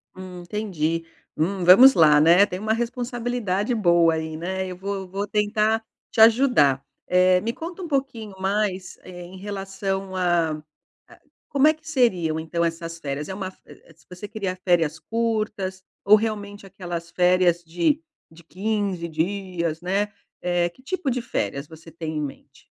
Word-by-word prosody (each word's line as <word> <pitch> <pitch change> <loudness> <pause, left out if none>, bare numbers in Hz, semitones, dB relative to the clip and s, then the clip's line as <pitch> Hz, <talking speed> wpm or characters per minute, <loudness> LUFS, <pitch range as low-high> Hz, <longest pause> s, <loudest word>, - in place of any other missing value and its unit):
Hum. 185 -1 -9
Entendi. 175 -4 -2 0.3
Hum, 185 +4 -1
vamos 245 +10 +9
lá, 150 -3 +6
né, 170 +6 +6
tem 185 -2 -6
uma 215 +2 0
responsabilidade 240 -3 -2
boa 170 -6 +4
aí, 160 0 -4
né, 190 +3 -3
eu 180 - -6
vou 200 +2 -4
eu 190 -1 -6
vou 195 +2 -3
tentar 215 +2 +1 0.3
te - - -4
ajudar. 220 - +5 0.2
Eh, 180 0 +4
me 230 +3 -2
conta 335 +7 -7
um 350 - -5
pouquinho 265 -8 -3
mais 190 -2 -1
em 180 +1 -10
relação 195 -1 -4
a 175 -3 +2 0.6
a, - - -18 0.3
como 280 +1 +3
é 310 - +5
que 315 0 -20
seriam 185 - +1
então 170 +1 -1
essas 165 0 -4
férias? 145 -1 -4
É - - -4
uma 190 -1 -4
v - - -28 0.2
vo - - -23
vo 165 - -27
você 180 +3 -8
queria 200 -4 -4
férias 170 -4 +1
curtas, 215 -4 -2 0.2
ou 205 +2 +7
realmente 205 -2 -3
aquelas 175 -3 -6
férias 180 -1 +3
de 175 - 0 0.3
de 165 +1 -16
15 195 -1 -2
dias, 170 -1 -2
né. 200 +3 -1 0.3
Eh, 175 -1 +1
que 175 - -22
tipo 360 0 -2
de 250 -1 -1
férias 140 - -3
você 160 +1 -13
tem 160 -1 -5
em - - -1
mente? 145 -2 -9
190 Hz, 165 wpm, -24 LUFS, 170-215 Hz, 0.6 s, vamos